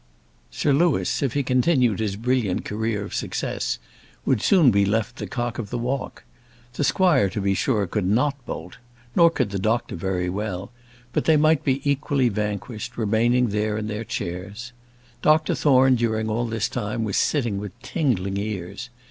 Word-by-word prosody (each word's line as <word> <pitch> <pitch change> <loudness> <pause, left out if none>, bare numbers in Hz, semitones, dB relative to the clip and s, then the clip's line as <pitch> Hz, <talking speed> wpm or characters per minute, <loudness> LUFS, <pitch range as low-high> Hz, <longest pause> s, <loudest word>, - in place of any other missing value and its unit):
Sir 145 - +1
Louis, 165 +2 +2
if 135 -4 0
he 145 - +1
continued 125 - +2
his 105 -3 -1
brilliant 115 -3 0
career 110 -1 -2
of 100 - -8
success, - - -2 0.5
would 125 -6 +2
soon 170 -10 +5
be 100 -1 +3
left 105 +1 0
the 105 - -5
cock 120 +4 -3
of 105 -4 -4
the 120 - -3
walk. 125 +3 -3 0.5
The 145 - -2
squire, 140 - +3
to 95 - -4
be 100 0 +1
sure, 105 0 +1
could 95 +1 -2
not 130 +6 +1
bolt, 85 +3 -7 0.4
nor 170 -1 +7
could 130 -10 -1
the 100 - -2
doctor 110 +5 0
very 90 +1 -2
well; 100 +1 -4 0.4
but - - 0
they 160 -1 +5
might 155 0 +3
be 135 +1 0
equally 140 -2 +1
vanquished, 105 +2 -4
remaining 120 +3 +2
there 105 +1 -1
in 110 - -3
their 105 +1 -4
chairs. 100 +5 -5 0.5
Dr 155 +1 +3
Thorne, 130 -3 +4
during 110 -2 0
all 120 +2 0
this 110 -1 -1
time, 110 -1 -3
was 105 -3 -2
sitting 120 -9 +1
with 100 -2 -8
tingling 100 - -1
ears. 100 +2 -5
115 Hz, 175 wpm, -24 LUFS, 100-130 Hz, 0.5 s, nor